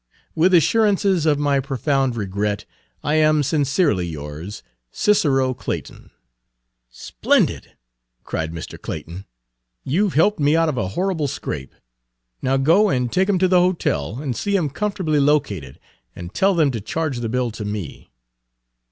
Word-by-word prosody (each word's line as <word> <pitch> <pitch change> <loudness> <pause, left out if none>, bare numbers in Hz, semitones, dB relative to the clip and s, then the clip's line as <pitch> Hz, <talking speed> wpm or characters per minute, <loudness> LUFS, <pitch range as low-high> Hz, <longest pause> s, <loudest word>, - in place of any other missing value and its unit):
"With 175 +4 +3
assurances 195 -2 +3
of 150 -2 +3
my 145 -1 +1
profound 135 -1 0
regret, 100 -1 -2 0.4
I 150 - 0
am 155 -1 +3
Sincerely 140 - +1
yours, 80 +6 -7 0.3
"CICERO 135 - +2
CLAYTON." - - -6
Page - - -18
121 - - +2
"Splendid!" - - -32 0.5
cried 80 0 -3
Mr. 80 -1 -8
Clayton. 85 +5 -7 0.6
"You 195 +9 +1
've - - -9
helped 190 +5 +3
me 145 +1 +3
out 165 -1 +3
of 140 - -3
a 95 - -1
horrible 180 -6 0
scrape. 65 - -6 0.7
Now, 135 +1 +1
go 170 +10 +4
and 125 -6 0
take 190 +2 +1
him 200 - +3
to 185 +1 +3
the 180 0 +4
hotel 165 - 0
and 135 -4 -3
see 200 - -1
him 160 -8 0
comfortably 185 -3 -1
located, 140 - 0 0.4
and 85 +2 -8
tell 195 - +2
them 155 -5 +3
to 115 -4 -4
charge 145 +4 -3
the 115 -2 -3
bill 125 0 -1
to 110 0 -7
me." 105 -7 -6
140 Hz, 155 wpm, -21 LUFS, 100-165 Hz, 0.7 s, go